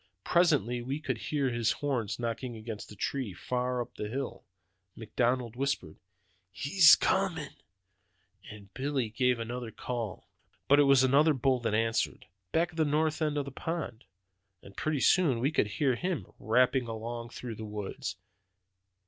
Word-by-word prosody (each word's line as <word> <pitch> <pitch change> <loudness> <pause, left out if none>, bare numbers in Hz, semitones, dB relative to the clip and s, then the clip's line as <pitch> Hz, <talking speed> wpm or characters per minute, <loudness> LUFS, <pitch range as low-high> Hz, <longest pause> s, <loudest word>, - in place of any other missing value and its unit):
Presently 145 -9 +2
we 135 +5 -3
could - - -3
hear 140 -4 +1
his 120 -1 +1
horns 130 -8 -2
knock 115 -1 -3
against 115 -3 -6
the 105 - -10
trees, 110 -5 -3
far 125 0 -1
up - - -16
on - - -2
the 105 - -4
hill. 135 +3 -4 0.5
McDonald 120 +1 -1
whispered, 130 - -2 0.5
'He's 145 - +6
comin',' 180 -6 0 0.9
and 105 -2 -12
Billy 135 -3 -1
gave 125 +1 +2
another 120 +1 -5
call. 115 -3 -5 0.4
"But 145 +1 +6
it 145 - +6
was 135 -1 +6
another 145 +4 +4
bull 130 0 +2
that 115 -3 -1
answered, 115 +1 0 0.3
back 170 +2 +1
of 165 - -14
the 160 - +4
north 155 +1 +1
end 150 -1 0
of 145 - -1
the 140 - -7
pond, 140 -5 -5 0.6
and 100 - -14
pretty 155 -3 -1
soon 155 -11 +4
we 135 +5 +1
could 110 - +2
hear 130 +6 +1
him 175 +5 -2
rapping 125 +2 +2
along 115 +1 -5
through 120 0 -7
the 110 - -8
woods. 105 -1 -5
125 Hz, 160 wpm, -30 LUFS, 115-145 Hz, 0.9 s, He's